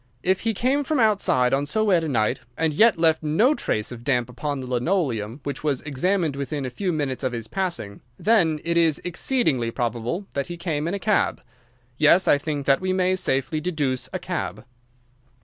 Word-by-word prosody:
If 190 +1 +2
he 225 -1 -1
came 265 +7 +1
from 295 0 0
outside 195 - +3
on 140 +1 +1
so 215 +7 +1
wet 185 -6 +3
a - - -2
night, 120 -1 +1 0.2
and 160 -1 +1
yet 220 +7 +5
left 160 -1 +3
no 165 - +3
trace 110 - -2
of 120 -1 -9
damp 125 -2 0
upon 140 +3 -4
the 130 - -5
linoleum, 125 - -1
which 140 +1 -5
was 145 -4 0
examined 155 +2 0
within 140 0 -3
a 130 - -4
few 190 +6 -2
minutes 145 -5 -2
of 130 -1 -1
his 115 -2 -5
passing, 120 - -4 0.2
then 175 -9 +2
it 170 0 0
is 165 -3 +3
exceeding 175 - 0
probable 120 - -2
that 140 -1 -2
he 175 - -6
came 160 -3 -2
in 180 - -1
a - - -1
cab. 210 +2 +1 0.6
Yes, 170 +5 +5
I 145 - +5
think 145 -2 -3
that 135 +3 +3
we 185 0 0
may 185 0 +2
safely 145 -3 -1
deduce 150 -7 -2
a - - -2
cab." - - -4
155 Hz, 200 wpm, -24 LUFS, 130-185 Hz, 0.6 s, yet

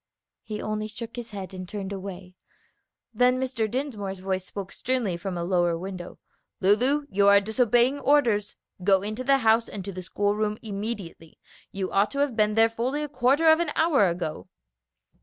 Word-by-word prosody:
He 215 -1 -6
only 215 0 -2
shook 230 +2 -8
his 240 -2 -6
head 195 -2 -7
and 185 -1 -7
turned 200 -1 -5
away. 190 -1 -8 0.8
Then 250 +3 +3
Mr. 250 -4 -1
Dinsmore's 215 -7 -3
voice 185 0 -3
spoke 200 -1 -7
sternly 245 -8 -1
from 180 +1 -5
a 170 - -2
lower 175 -1 +1
window, 180 0 -7 0.4
"Lulu, 250 +10 +3
you 200 +1 +3
are 200 0 +8
disobeying 240 +5 +2
orders. 245 -8 +2 0.3
Go 190 0 +4
into 215 +4 -4
the 275 +1 +4
house 225 +1 +4
and 195 -3 -6
to 200 - -4
the 185 - -6
school 205 +3 0
room 210 0 -1
immediately. 200 -6 -6 0.3
You 190 -1 -3
ought 200 +1 +3
to - - -5
have 280 -4 +1
been 215 -1 +2
there 225 0 +6
fully 250 +6 -2
a - - -3
quarter 275 +3 +2
of 315 - +4
an 340 -3 0
hour 290 - +4
ago." 165 - -4
210 Hz, 180 wpm, -26 LUFS, 190-245 Hz, 0.8 s, are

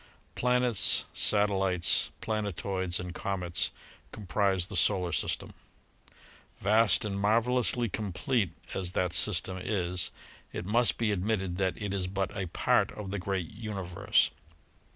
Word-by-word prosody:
Planets, 125 -3 +3
satellites, 95 -4 +3
planetoids 100 -5 -2
and 90 -1 -6
comets 90 -4 -2 0.4
comprise 100 -3 -1
the - - -8
Solar 90 -4 +2
System. - - -2 1.0
Vast 110 +2 +3
and 100 -1 -3
marvelously 120 +3 +1
complete 105 - -2 0.2
as 90 -1 -2
that 90 -2 -1
system 95 -1 +4
is, 90 -3 0 0.4
it - - -6
must 115 +4 +3
be 115 -2 0
admitted 95 -2 -2
that 95 -1 -1
it 105 -2 -4
is 95 -2 -2
but 95 +1 -3
a 95 -2 -3
part - - +1
of 100 -3 -7
the 100 - -3
great 95 -2 -3
universe. 100 -3 -1
100 Hz, 125 wpm, -29 LUFS, 90-110 Hz, 1.0 s, system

